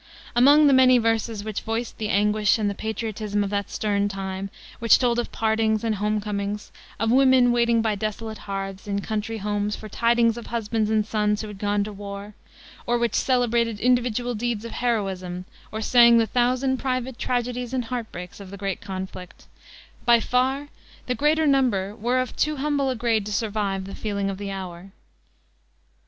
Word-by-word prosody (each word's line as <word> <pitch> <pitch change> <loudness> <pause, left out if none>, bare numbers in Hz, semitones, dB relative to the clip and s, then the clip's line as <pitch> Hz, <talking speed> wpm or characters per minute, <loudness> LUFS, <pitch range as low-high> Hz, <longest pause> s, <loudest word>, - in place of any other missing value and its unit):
Among 285 +5 +7
the 280 - +6
many 255 -1 +6
verses 225 -2 0
which 215 -1 -4
voiced 225 +1 -4
the 215 -1 -2
anguish 210 0 +3
and 215 -2 0
the 200 - 0
patriotism 215 -1 -3
of 200 - -4
that 200 -1 -2
stern 205 -1 0
time, 195 0 -4 0.3
which 230 -1 +6
told 240 -2 +1
of 240 - -3
partings 220 -1 +1
and 225 -1 +1
homecomings, 210 0 -2 0.3
of 225 +1 +1
women 260 -1 +5
waiting 235 -1 +2
by 220 -1 +1
desolate 215 +1 -4
hearths, 195 +1 -5
in 200 0 -1
country 220 +2 -3
homes, 205 0 -1
for 215 - -9
tidings 230 +1 +2
of 235 - -8
husbands 225 -1 -1
and 215 -1 +2
sons 210 -1 0
who - - -6
had 205 -2 -10
gone 205 0 +1
to 210 - -6
the - - -10
war, 200 +1 -8 0.5
or 240 0 +2
which 235 -1 0
celebrated 235 -4 +1
individual 245 0 +1
deeds 230 -1 -2
of 230 - -6
heroism 190 -6 -2 0.3
or 220 - -4
sang 235 0 +6
the 230 - +4
thousand 255 +3 +1
private 255 -1 -3
tragedies 245 0 -2
and 255 -2 -1
heart 235 -1 -4
breaks 180 +2 -8
of 195 -2 -10
the 200 - -8
great 195 -1 -3
conflict, 190 -2 -7 0.6
by 235 -2 +5
far 265 +4 0 0.4
the 250 - 0
greater 300 +5 +2
number 240 -9 +2
were 240 +4 0
of 255 0 -2
too 305 0 +1
humble 285 -1 0
a 260 - -1
grade 225 -2 +1
to 210 - -6
survive 200 -2 -1
the 195 - -8
feeling 200 -2 -2
of 190 - -7
the 200 -1 -4
hour. 190 -1 -7
220 Hz, 185 wpm, -24 LUFS, 205-240 Hz, 0.6 s, Among